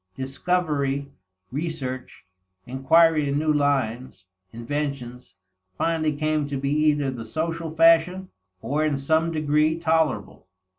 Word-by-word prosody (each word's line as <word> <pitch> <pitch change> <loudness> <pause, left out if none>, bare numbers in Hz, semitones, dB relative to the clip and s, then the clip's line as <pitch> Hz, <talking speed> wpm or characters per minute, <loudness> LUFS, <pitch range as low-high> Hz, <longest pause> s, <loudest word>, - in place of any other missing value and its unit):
Discovery, 140 -1 -1 0.4
research, 130 - -5 0.4
inquiry 150 +4 +3
in 140 - 0
new 155 0 +1
lines, 130 -7 -1 0.3
inventions, 125 0 -5 0.4
finally 160 -2 0
came 155 0 0
to 140 -1 -3
be 140 +1 -2
either 150 -2 +2
the 120 -3 -7
social 165 +7 -3
fashion, 165 +3 +4 0.3
or 150 +3 0
in 150 -3 0
some 160 +4 +1
degree 155 0 +1
tolerable. 160 - -1
150 Hz, 110 wpm, -24 LUFS, 135-160 Hz, 0.4 s, fashion